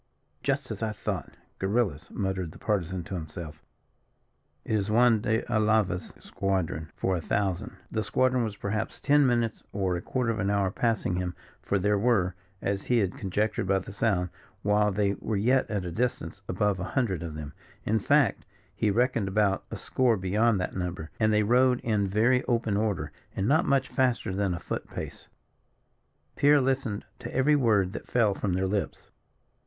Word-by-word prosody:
"Just - - -1
as - - -5
I 110 -1 -1
thought, 100 -7 -4 0.2
guerillas," 95 -6 0
muttered 95 -4 -3
the - - -12
Partisan 95 -4 -1
to 100 - -8
himself. 80 -2 -6 1.0
"It - - -2
is 105 -1 +1
Juan 115 0 +4
de 110 +2 +1
Alava's 110 -5 +1
squadron, 90 -5 -2
for 95 - 0
a 85 - -2
thousand." 95 +1 -1 0.2
The 110 - 0
squadron 130 +3 +2
was 105 -3 -4
perhaps 105 +2 -3
ten 145 -1 +4
minutes 120 -3 0
or 95 -3 0
a 85 - -3
quarter 125 +1 -1
of 110 - -3
an 100 0 0
hour 100 -2 +1
passing 110 -5 0
him, 90 -1 -2 0.3
for 100 - 0
there 105 +2 +2
were, 100 -5 +2 0.3
as 100 0 -1
he 125 - +2
had 100 -5 +1
conjectured 100 0 -1
by 95 0 +3
the 95 +1 -6
sound, 100 -4 +1 0.3
while 105 0 +3
they 100 0 +1
were 110 - -2
yet 125 +6 +2
at 100 -4 -2
a 90 - -4
distance, 95 -3 -2
above 100 0 +1
a - - -2
hundred 105 -10 +1
of 80 -2 -5
them 75 -2 -7 0.3
in 110 +1 +2
fact, - - +3 0.3
he 110 - +1
reckoned 115 -1 +1
about 100 0 +1
a - - -5
score 125 -4 +1
beyond 105 +3 +2
that 90 - -3
number 90 -3 -4
and 110 -1 +3
they 105 0 +3
rode 125 +3 +4
in 105 -3 +1
very 115 +6 +3
open 115 -4 +1
order, 105 -2 -1 0.2
and 95 - 0
not 155 +6 +4
much 135 -2 +2
faster 125 -8 0
than 95 -2 0
a - - -5
foot - - -5
pace. - - -7 1.1
Pierre 145 +1 +5
listened 130 -5 -1
to - - -7
every 145 +3 +3
word 105 -8 +2
that - - -7
fell 115 -4 +3
from 95 -1 -2
their 95 +1 +1
lips. 100 +1 -3
105 Hz, 180 wpm, -28 LUFS, 95-115 Hz, 1.1 s, Pierre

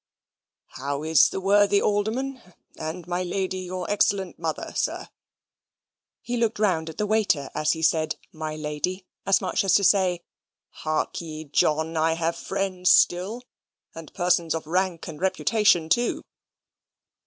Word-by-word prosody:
"How 140 +2 -3
is 160 -1 +5
the - - -4
worthy 200 +1 +4
alderman, 230 +7 -1 0.3
and 160 +2 -6
my 175 +1 -2
lady, 185 +1 -2
your 185 -1 -5
excellent 200 -3 0
mother, 160 -2 -4
sir?" - - -2 1.1
He 245 0 -3
looked 230 -2 0
round 180 -7 +1
at 160 - -10
the 210 - 0
waiter 205 -10 +1
as 155 0 +1
he 160 -1 -5
said, 155 -1 +2 0.2
"My 155 -1 -5
lady," 155 +5 -3 0.2
as 195 - +4
much 190 - 0
as 190 -2 +3
to 200 - +4
say, 185 -3 +3 0.5
"Hark 155 +2 -2
ye, 155 -2 -7
John, 160 +2 +1
I 160 +1 +2
have 165 0 -1
friends 185 0 -1
still, 195 +8 +3 0.5
and 165 -2 -10
persons 175 -3 +1
of 160 - -4
rank 180 +1 -1
and 155 -1 -8
reputation, 190 -2 +2
too." 240 +9 +1
180 Hz, 145 wpm, -25 LUFS, 160-195 Hz, 1.1 s, is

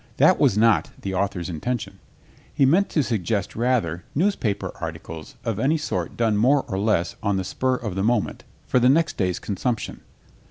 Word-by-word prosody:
That - - +5
was 100 - +3
not 115 0 +4
the 95 - -4
author's 95 -2 -1
intention. 105 +8 -4 0.5
He 135 - +3
meant 180 +9 +3
to 150 - +1
suggest 105 -4 -1
rather 110 -9 0
newspaper 140 - 0
articles 80 -1 -7
of 110 -3 -1
any 145 +7 +2
sort 95 - -3
done 115 -3 +2
more 130 +6 +3
or 95 -4 -2
less 100 -5 +1
on 100 -2 0
the 95 - -1
spur 130 +7 0
of 110 -6 -4
the 95 - -2
moment 110 +1 0 0.2
for 125 - +2
next 140 +7 +3
day's 90 -3 0
consumption. 110 +3 -3
110 Hz, 170 wpm, -24 LUFS, 95-125 Hz, 0.5 s, That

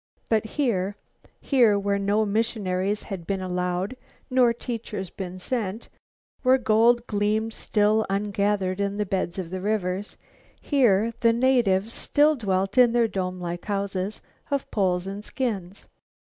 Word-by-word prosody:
But 220 -1 +2
here, 205 -8 0 0.5
here 235 -7 +4
where 200 0 0
no 205 +2 +1
missionaries 205 -2 -1
had 190 -5 -7
been 195 -1 -1
allowed 180 +3 -2 0.4
nor 250 -2 +5
teachers 230 -5 -5
been 185 -1 -6
sent, 215 +1 -3 0.5
where 260 0 +5
gold 235 0 +3
gleamed 215 +1 0
still 215 +1 +1
ungathered 200 -1 0
in 200 0 -1
the 210 - 0
beds 185 -2 -2
of 180 -3 -5
the 185 0 -4
rivers, 200 -1 -2 0.4
here 230 -6 +2
the 230 -2 +4
natives 230 -4 +2
still 300 +1 +3
dwelt 195 -1 0
in 240 -2 +6
their 235 -1 +3
dome 185 -2 -3
like 175 0 -5
houses 200 -1 -3 0.3
of 280 -2 -2
poles 180 -3 +1
and 200 +2 -6
skins. 205 -7 -4
205 Hz, 140 wpm, -25 LUFS, 190-230 Hz, 0.5 s, in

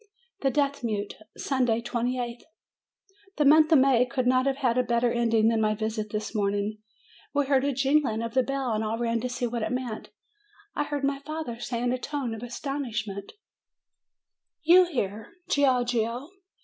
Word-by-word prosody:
THE 270 - +2
DEAF 280 -1 0
MUTE 210 -3 -2 0.2
Sunday, 250 -5 +1
28th. 240 0 -2 1.0
The 300 - +3
month 310 +2 +6
of 315 - +8
May 260 -2 +5
could 255 0 -2
not 255 +1 +3
have 270 - +1
had 250 -4 +1
a - - +3
better 235 0 +1
ending 230 -2 +3
than 225 -1 +1
my 215 0 +2
visit 215 0 -3
this 210 +1 -4
morning. 205 0 -1 0.6
We 285 0 +2
heard 270 -1 +2
a 285 - +1
jing 275 +3 +3
ling 225 -3 -2
of 230 -1 -4
the 260 - +4
bell, 270 -1 -2
and 215 0 -1
all 220 +1 -2
ran 230 -1 0
to 250 - -2
see 245 0 -2
what 235 0 -3
it 215 - -2
meant. 250 -3 -4 0.7
I 295 - 0
heard 290 -1 -3
my 275 0 0
father 295 -5 -5
say 240 0 -3
in 245 0 +1
a 255 - -2
tone 275 -4 -3
of 225 - -7
astonishment: 235 -6 -4 1.3
"You 355 +3 +7
here, 220 - -4 0.2
Giorgio?" 245 -1 +1
245 Hz, 180 wpm, -27 LUFS, 225-275 Hz, 1.3 s, of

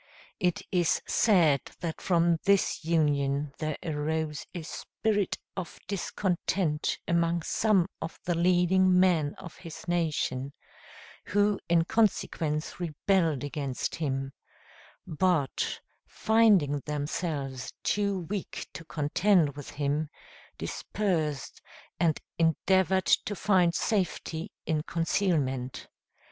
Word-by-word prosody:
It 180 -4 0
is 175 -3 +2
said 165 - +4 0.2
that 165 -2 -4
from 170 -2 +2
this 200 -3 +2
union 145 -3 +1
there 155 -1 -2
arose 155 -1 -2
a 175 -3 -6
spirit 205 +4 -2 0.2
of 185 -3 -6
discontent 180 -4 -1
among 170 0 +1
some 200 -3 +2
of 160 - -6
the 175 - 0
leading 180 +2 +4
men 165 -6 +3
of 175 -3 -10
his 170 -2 -10
nation, 155 -5 -1 0.7
who 205 0 +2
in 165 -1 +4
consequence 165 -8 0
rebelled 165 -2 +1
against 140 -3 -3
him; 135 -4 -2 0.7
but, 160 -3 0 0.3
finding 205 -11 +3
themselves 145 -3 -3
too 200 -2 0
weak 190 +3 -5
to - - -8
contend 160 +1 +2
with 145 -2 -8
him, 145 +1 -1 0.5
dispersed, 160 - -2 0.4
and 165 -3 +2 0.2
endeavored 190 +3 +3
to 205 - +2
find 180 -4 +3
safety 180 -5 -1
in 155 -2 0
concealment. 155 -7 -1
165 Hz, 105 wpm, -28 LUFS, 150-185 Hz, 0.7 s, said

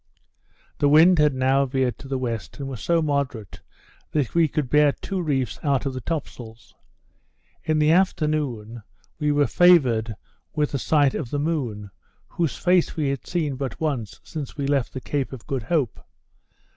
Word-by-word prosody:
The 145 - +3
wind 160 +4 +6
had 150 -2 +3
now 130 +1 +2
veered 130 -3 -1
to 140 - -10
the 135 0 -2
west, 115 -9 -4
and 140 - -5
was 130 -5 -7
so 170 -1 +1
moderate, 140 -8 -3 0.5
that 145 -6 0
we 170 -1 +4
could 150 -1 -2
bear 150 +2 +4
two 190 -2 -4
reefs 135 -6 -1
out 140 -2 0
of 135 - -2
the 130 - -5
top 160 +4 -3
sails. 115 -2 -13 0.9
In 155 0 +1
the 155 0 +4
afternoon, 150 - 0 0.4
we 150 -1 +1
were 145 0 +3
favoured 125 -13 +4 0.4
with 150 -2 0
a 140 - 0
sight 145 0 +2
of 135 -6 -4
the 145 - -2
moon, 125 -10 -2 0.4
whose 165 -5 -2
face 180 -1 +2
we 150 -3 0
had 135 -2 -4
seen 155 -7 -1
but 135 -3 -5
once 135 -10 -3
since 150 -4 -7
we 140 - -2
left 140 -3 0
the 130 - -4
Cape 140 0 -2
of 130 -5 -9
Good 135 -2 -2
Hope. 135 - -1
140 Hz, 180 wpm, -24 LUFS, 125-155 Hz, 0.9 s, wind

